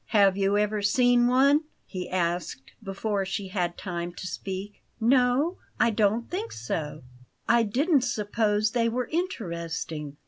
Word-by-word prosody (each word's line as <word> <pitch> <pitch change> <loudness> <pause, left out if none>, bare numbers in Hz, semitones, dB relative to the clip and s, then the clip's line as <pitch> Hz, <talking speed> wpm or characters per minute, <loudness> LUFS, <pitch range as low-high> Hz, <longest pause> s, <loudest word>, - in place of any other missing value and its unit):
"Have 200 -3 +4
you 200 +1 +2
ever 210 0 0
seen 240 +3 +4
one?" 280 +5 +4 0.2
he 180 -2 -6
asked 170 - -2
before 195 +1 -2
she 190 0 -4
had 175 -3 -2
time 175 -2 -4
to 185 - -8
speak. 195 +2 -6 0.2
"No; 255 +8 +2 0.2
I 230 - +4
don't 215 +2 +1
think 415 +6 -4
so. 150 -2 -4 0.4
I 235 0 +5
didn't 270 - +2
suppose 210 -2 0
they 230 -1 +1
were 245 +1 -2
interesting." 170 - -4
210 Hz, 140 wpm, -27 LUFS, 185-245 Hz, 0.4 s, I